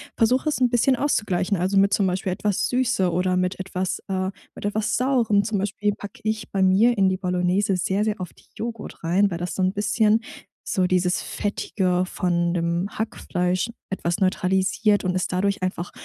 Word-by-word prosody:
versuch 250 +5 +2
es 300 - 0
'n 250 - +4
bisschen 245 +3 +3
auszugleichen, 210 -8 0
also 185 +3 0
mit 200 +1 +4
zum 200 -3 +2
Beispiel 185 +1 -1
etwas 200 +1 0
Süße 245 -8 +1
oder 180 +1 +1
mit 185 +1 -1
etwas, 185 -1 -3
äh, 190 -1 -1 0.3
mit - - -7
etwas 215 +1 0
Saurem. 240 -6 +2
Zum 215 0 -1
Beispiel 205 +1 -1
pack 205 -1 -9
ich 215 -1 -2
bei 195 - 0
mir 210 +5 +4
in 190 -1 +4
die 185 - -1
Bolognese 180 +1 +1
sehr, 190 +3 0
sehr 215 -1 -1
oft 180 -2 -8
Joghurt 230 -4 -6
rein, 185 +5 +3
weil 170 - -4
das 175 -2 -4
so 190 - -2
'n 185 +1 +1
bisschen 215 +1 +2 0.4
so 185 -4 0
dieses 180 0 +1
Fettige 185 -3 -1
von 175 -1 0
dem 170 +2 0
Hackfleisch 185 -3 -1 0.2
etwas 175 -1 -2
neutralisiert 190 +2 +2
und 180 -1 0
es 185 - 0
dadurch 195 +1 -1
einfach 180 -1 -3
190 Hz, 185 wpm, -23 LUFS, 180-210 Hz, 0.4 s, n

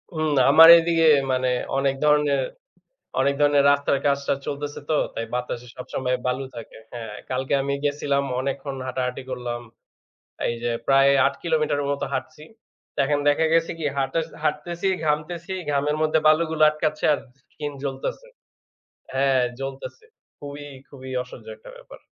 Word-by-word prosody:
উম 155 0 0 0.2
আমার 165 +3 +9
এদিকে 165 0 +2 0.3
মানে 130 0 +1 0.3
অনেক 135 0 +1
ধরনের, 150 -1 +3 0.8
অনেক 140 +1 +2
ধরনের 145 -1 +4
রাস্তার 140 -1 +1
কাজটাজ 140 -1 +1
চলতেছে 145 0 -4
তো। - - +2 0.2
তাই 115 - -4
বাতাসে 125 0 -4
সবসময় 125 0 -2
বালু 130 +2 -1
থাকে। 115 - -10 0.2
হ্যাঁ, 115 -3 -7 0.2
কালকে 130 +1 -1
আমি 140 +1 -2
গেছিলাম 145 -1 0 0.2
অনেকক্ষণ 135 +1 -4
হাঁটাহাঁটি 125 0 -3
করলাম। 120 -2 -4 0.9
এই 120 - -1
যে, 120 - 0 0.2
প্রায় 135 0 +5 0.2
৮ - - -2
কিলোমিটারের 155 -3 0
মত 140 - -3
হাঁটছি। 155 -1 -5 0.6
এখন 145 +1 +1
দেখা 155 +3 +2
গেছে 165 0 +2
কি? 155 - -3
হাঁট 135 -1 0 0.3
হাঁটতেছি, 160 +4 -2 0.2
ঘামতেছি। 165 +4 -2 0.2
ঘামের 145 +1 0
মধ্যে 155 0 +2
বালুগুলো 155 0 +2
আটকাচ্ছে 155 0 -2
আর - - -2 0.3
স্কিন 150 -1 -5
জ্বলতেছে 140 - -4 0.9
হ্যাঁ, 135 -1 +2 0.2
জ্বলতেছে। 135 - -7 0.3
খুবই, 145 0 -8 0.2
খুবই 130 -2 -11
অসহ্য 125 - -13
একটা - - -14
ব্যাপার। - - -14
140 Hz, 140 wpm, -23 LUFS, 135-155 Hz, 0.9 s, আমার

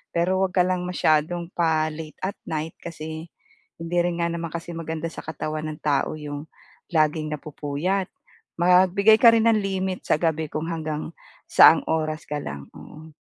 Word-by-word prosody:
Pero 180 +3 +2
'wag 185 -1 -2
ka 180 - +5
lang 185 -1 -1
masyadong 170 0 +1
pa-late 155 -2 0
at 190 +2 -2
night 160 0 -3
kasi 160 -1 -7 0.5
hindi 165 +1 -2
rin 175 0 0
nga - - +2
naman 170 0 -3
kasi 170 0 -5
maganda 165 0 -4
sa - - -9
katawan 155 0 -4
ng 150 - -10
tao 145 0 +1
'yong 150 0 -7 0.5
laging 155 -1 +1
napupuyat. 155 +6 -2 0.5
Magbigay 185 +4 +5
ka 230 0 +8
rin 230 0 +3
ng 225 - +4
limit 190 -1 -2
sa - - +3
gabi 160 -2 +1
kung 155 +1 -3
hanggang 155 -2 -3 0.4
saang 165 - +8
oras 155 -1 -1
ka 150 - -2
lang. 70 - -6
Oo. 155 +1 -12
160 Hz, 165 wpm, -24 LUFS, 155-180 Hz, 0.5 s, ka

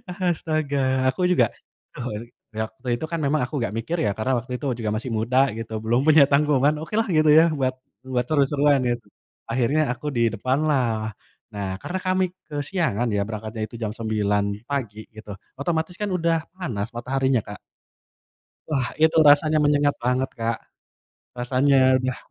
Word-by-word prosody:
Astaga, 145 -7 0
aku 180 +6 0
juga 130 -9 +4 0.5
duh 120 - -6 0.5
waktu 110 +3 -5
itu 140 - -4
kan 165 - -1
memang 145 +2 +1
aku 145 +3 -4
nggak 115 -3 -2
mikir 160 +10 -2
ya, 105 - +2
karena 130 +4 0
waktu 125 +2 -11
itu 145 - -7
juga 110 -2 -2
masih 115 +3 -4
muda 120 +4 0 0.2
gitu 115 -1 -6
belum 115 +2 +2
punya 155 -1 +8
tanggungan, 145 0 +3
okelah 215 +8 -1
gitu 155 0 +4
ya 165 - +6
buat 130 -1 0 0.3
buat 125 -2 0
seru-seruan 145 -1 +3
gitu. 120 -1 -2 0.5
Akhirnya 130 +6 +2
aku 130 - -7
di 120 - +1
depanlah. 125 -3 0 0.4
Nah, 100 -1 -3
karena 185 - -4
kami 185 0 +2 0.2
kesiangan 145 - -1
ya 100 - +1
berangkatnya 110 0 -6
itu - - -12
jam 110 -3 -2
9.00 105 -3 0 0.3
pagi 110 -7 -4
gitu, 110 -1 -10 0.3
otomatis 160 +3 -1
kan 210 - -1
udah 170 -2 +1 0.2
panas 115 - -3
mataharinya, 130 +1 +1
Kak. 105 0 -9 1.1
Wah, 135 -5 0
itu 160 +1 +4
rasanya 155 +1 +5
menyengat 145 -1 +3
banget, 125 +2 0
Kak. 115 0 -1 0.8
Rasanya 130 +1 +3
udah 130 0 -2
130 Hz, 155 wpm, -23 LUFS, 115-150 Hz, 1.1 s, punya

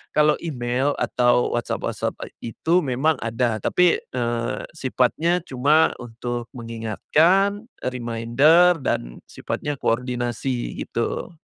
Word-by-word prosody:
kalau 150 0 +4
email 130 -2 -1
atau 120 0 +2
WhatsApp-WhatsApp 120 - -2
e 115 - -9
itu 170 +9 +2
memang 140 +4 +1
ada, 115 0 0
tapi, 180 -1 +4
eee, 120 -1 -3
sifatnya 160 +5 +1
cuma 145 +5 +3
untuk 120 0 -5
mengingatkan, 150 - +1 0.2
e - - -1
reminder, 125 +9 +4
dan - - -2
sifatnya 145 0 -4
koordinasi, 120 +1 -2
gitu. 115 +9 -3
125 Hz, 105 wpm, -23 LUFS, 120-155 Hz, 0.2 s, kalau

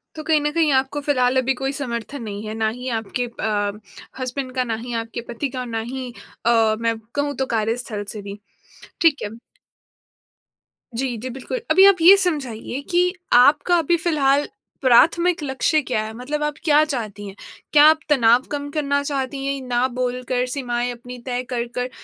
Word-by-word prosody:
तो 310 - -6
कहीं 310 -1 +3
न 295 0 0
कहीं 320 -2 +2
आपको 265 +2 0
फिलहाल 260 -3 +1
अभी 260 +1 +2
कोई 270 +1 -3
समर्थन 260 -1 -5
नहीं 205 -1 -6
है, 215 - -4
ना 220 0 0
ही 250 +3 -7
आपके 225 +3 -3
अ, 210 -3 -2 0.5
हसबैंड 255 0 -4
का, 255 - +1
ना 230 -2 -2
ही 240 +2 -7
आपके 230 +1 -4
पति 240 +4 -3
का, 255 -1 -5
ना 230 -2 -3
ही 260 -2 -5 0.3
अ, 225 -2 +4
मैं 230 -1 0 0.2
कहूँ 285 0 -1
तो 265 - -1
कार्यस्थल 220 -1 -2
से 210 - -7
भी, 200 +1 -8 0.6
ठीक 325 -4 +4
है। 205 - -3 1.7
जी, 250 0 -2
जी, 250 +4 -6
बिल्कुल। 270 - -4
अभी 380 +5 +7
आप 395 -3 +5
ये 365 +4 +9
समझाइए 270 -6 -3
कि 360 +1 +3 0.2
आपका 285 +7 +5
अभी 335 +2 +2
फिलहाल 290 -4 +2 0.3
प्राथमिक 335 +7 +4
लक्ष्य 290 +3 +1
क्या 255 -5 -1
है, 220 0 -6
मतलब 280 +6 -4
आप 300 0 -1
क्या 305 -2 +5
चाहती 215 -8 -5
हैं? 195 - -9 0.4
क्या 295 -1 +7
आप 315 0 +3
तनाव 240 -4 +5
कम 285 -1 -3
करना 285 -1 0
चाहती 275 -1 -3
हैं, 275 0 -2
ना 245 +1 +1
बोलकर 250 0 -1
सीमाएँ 245 -2 -2
अपनी 245 +1 -9
तय 250 -1 -2
कर 245 -2 -1
कर 250 0 -2
255 Hz, 180 wpm, -21 LUFS, 235-290 Hz, 1.7 s, ये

